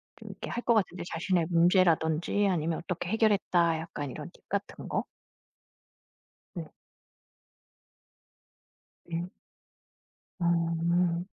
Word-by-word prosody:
좀 -, -, -11 dB
이렇게 -, -, -7 dB
할 240 Hz, -, -3 dB
것 235 Hz, -, +4 dB
같은데 185 Hz, -5 st, 0 dB
자신의 170 Hz, 0 st, +1 dB
문제라든지 170 Hz, +1 st, +3 dB
아니면 165 Hz, -2 st, 0 dB
어떻게 175 Hz, 0 st, -3 dB
해결했다 195 Hz, -7 st, +3 dB
약간 150 Hz, -3 st, -5 dB
이런 130 Hz, -, -7 dB
팁 -, -, -24 dB
같은 200 Hz, 0 st, -4 dB
거. -, -, -1 dB, 1.5 s
네. 165 Hz, -5 st, -7 dB, 2.4 s
예. 175 Hz, +3 st, -3 dB, 1.1 s
아. 170 Hz, 0 st, +1 dB
170 Hz, 200 characters per minute, -29 LUFS, 165-185 Hz, 2.4 s, 것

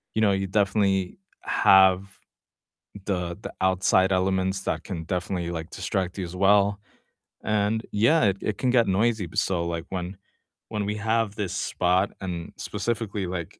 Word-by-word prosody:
you 110 Hz, -, +1 dB
know, 105 Hz, -2 st, +4 dB
you 95 Hz, 0 st, 0 dB
definitely 95 Hz, -1 st, +1 dB, 0.2 s
have 95 Hz, 0 st, +5 dB, 1.0 s
the 90 Hz, -3 st, -2 dB
the -, -, -6 dB
outside 95 Hz, 0 st, +3 dB
elements 95 Hz, 0 st, +1 dB
that -, -, -2 dB
can 85 Hz, -5 st, -5 dB
definitely, 90 Hz, 0 st, -2 dB
like, 80 Hz, 0 st, -5 dB
distract 95 Hz, -2 st, -3 dB
you 95 Hz, -, -3 dB
as 85 Hz, +1 st, -8 dB
well, 100 Hz, +1 st, +3 dB, 0.6 s
and 105 Hz, +1 st, 0 dB
yeah, 115 Hz, +7 st, +3 dB
it 100 Hz, -1 st, +2 dB
it 105 Hz, -, -2 dB
can 130 Hz, -, 0 dB
get 120 Hz, -4 st, +4 dB
noisy 110 Hz, +1 st, +1 dB
but 80 Hz, -, -1 dB
so, 85 Hz, -3 st, 0 dB
like, 85 Hz, -1 st, -3 dB
when 90 Hz, 0 st, -5 dB, 0.5 s
when 105 Hz, -2 st, -2 dB
we 105 Hz, +1 st, -2 dB
have 110 Hz, 0 st, 0 dB
this 100 Hz, -3 st, -3 dB
spot, 90 Hz, 0 st, +1 dB
and 85 Hz, -3 st, -5 dB
specifically, 105 Hz, -2 st, -3 dB
like, 90 Hz, -2 st, -6 dB
95 Hz, 160 wpm, -25 LUFS, 90-105 Hz, 1.0 s, have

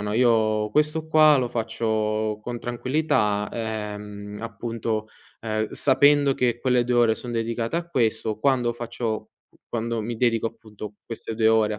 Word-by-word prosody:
no, 105 Hz, +1 st, -2 dB
io 110 Hz, -3 st, +3 dB
questo 150 Hz, +4 st, +1 dB
qua 155 Hz, -1 st, +6 dB
lo 125 Hz, -3 st, 0 dB
faccio 110 Hz, -2 st, -1 dB
con 120 Hz, +1 st, -4 dB
tranquillità, 120 Hz, -4 st, 0 dB
ehm, 105 Hz, -2 st, -5 dB
appunto, 115 Hz, 0 st, -3 dB, 0.3 s
ehm, 110 Hz, -1 st, -1 dB
sapendo 140 Hz, +1 st, +4 dB
che 120 Hz, -3 st, 0 dB
quelle 125 Hz, -1 st, +2 dB
2 125 Hz, +1 st, 0 dB
ore 115 Hz, -2 st, +4 dB
sono 120 Hz, +1 st, -7 dB
dedicate 115 Hz, +4 st, -1 dB
a 170 Hz, 0 st, -2 dB
questo. 110 Hz, -8 st, 0 dB
Quando 125 Hz, -1 st, +2 dB
faccio 115 Hz, -1 st, -4 dB, 0.4 s
quando 115 Hz, 0 st, -2 dB
mi 115 Hz, +2 st, -4 dB
dedico, 115 Hz, -1 st, +2 dB
appunto, 105 Hz, -2 st, -9 dB
queste 115 Hz, -1 st, -6 dB
2 110 Hz, 0 st, +3 dB
ore 110 Hz, -1 st, +3 dB
a 105 Hz, -, -7 dB
115 Hz, 155 wpm, -24 LUFS, 110-125 Hz, 0.4 s, qua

